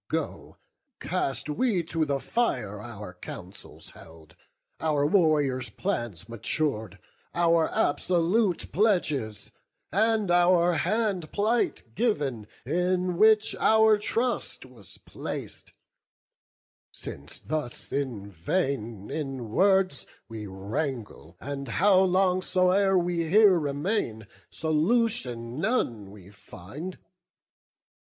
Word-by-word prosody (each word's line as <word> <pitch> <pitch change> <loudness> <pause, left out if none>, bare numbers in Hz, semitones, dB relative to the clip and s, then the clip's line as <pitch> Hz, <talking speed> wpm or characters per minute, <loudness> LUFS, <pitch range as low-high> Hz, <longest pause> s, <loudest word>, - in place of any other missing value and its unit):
Go, - - -4 0.4
cast 160 -7 -2
we 180 +4 0
to 165 -1 -1
the 140 -2 -1
fire 105 - -1
Our 105 -5 -8
councils 90 - -10
held, 80 -1 -16 0.4
our 150 -3 +1
warriors' 150 -7 +2
plans 115 -9 -3
matur'd, 115 - -2 0.4
Our 170 -1 +3
absolute 180 +5 +1
pledges, 155 - 0 0.4
and 215 0 +2
our 175 0 +4
hand 195 -3 0
plight 225 +3 0
giv'n, 140 - -1 0.2
In 180 +4 0
which 215 0 +5
our 220 -1 +5
trust 230 - -1
was 115 -8 -12
placed; - - -7 1.2
since 70 +2 -8
thus 150 -5 -4
in 125 -8 -3
vain 110 - -2
In 135 -6 -4
words 190 - +2 0.2
we 110 -2 -7
wrangle, 100 - -5
and 140 0 -5
how 185 - +4
long 185 0 +3
soe'er 185 +1 +3
We 170 -2 0
here 200 -1 +6
remain, 145 - -2 0.2
solution 155 - 0
none 120 - -1
we 100 -1 -14
find. 110 - -9
155 Hz, 100 wpm, -27 LUFS, 115-185 Hz, 1.2 s, here